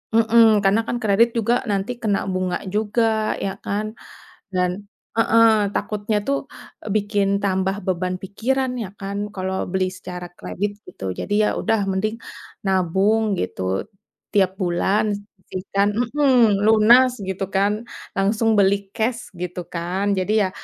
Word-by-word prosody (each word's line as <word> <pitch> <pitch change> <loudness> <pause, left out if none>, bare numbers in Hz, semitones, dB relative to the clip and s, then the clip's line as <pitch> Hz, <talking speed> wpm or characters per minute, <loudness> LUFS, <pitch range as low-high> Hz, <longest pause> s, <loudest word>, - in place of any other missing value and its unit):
mhm. 225 -1 +5
Karena 200 +3 +4
kan, 240 - -1
kredit 220 +3 +4
juga 230 +1 +2 0.2
nanti 200 +3 -1
kena 205 -3 +2
bunga 185 -1 -1 0.2
juga, 220 0 +1
ya 195 - -2
kan? 205 +2 -1 0.7
Dan 180 -1 +1 0.5
heeh, 225 0 +5 0.2
takutnya 210 0 -1
tuh, 280 0 +2 0.6
bikin 205 -1 +1 0.2
tambah 190 0 +1
beban 185 0 -1
pikiran, 255 +7 -1
ya 195 - -7
kan. 200 0 -4 0.2
Kalo 190 0 -3 0.2
beli 190 0 +1
secara 180 -1 -7
kredit, 205 +2 -3 0.2
gitu. - - -11 0.2
Jadi, 205 - -3
ya - - +3
udah 225 - +1
mending 215 +4 -1 0.5
nabung, 195 +4 +2
gitu. 90 0 -4 0.7
Tiap 190 -2 +3
bulan 190 +4 +1 0.4
sisihkan 195 +2 0 0.2
mhm. 250 -8 +4
Lunas, 225 +4 +6 0.2
gitu 190 +1 -2
kan. 200 +1 +3 0.5
Langsung 210 +3 +2
beli 200 0 +5 0.2
cash, 220 -2 -2
gitu 180 0 -4
kan. 175 +3 -2
Jadi 190 +3 0
ya, - - -2
205 Hz, 135 wpm, -22 LUFS, 190-225 Hz, 0.7 s, Lunas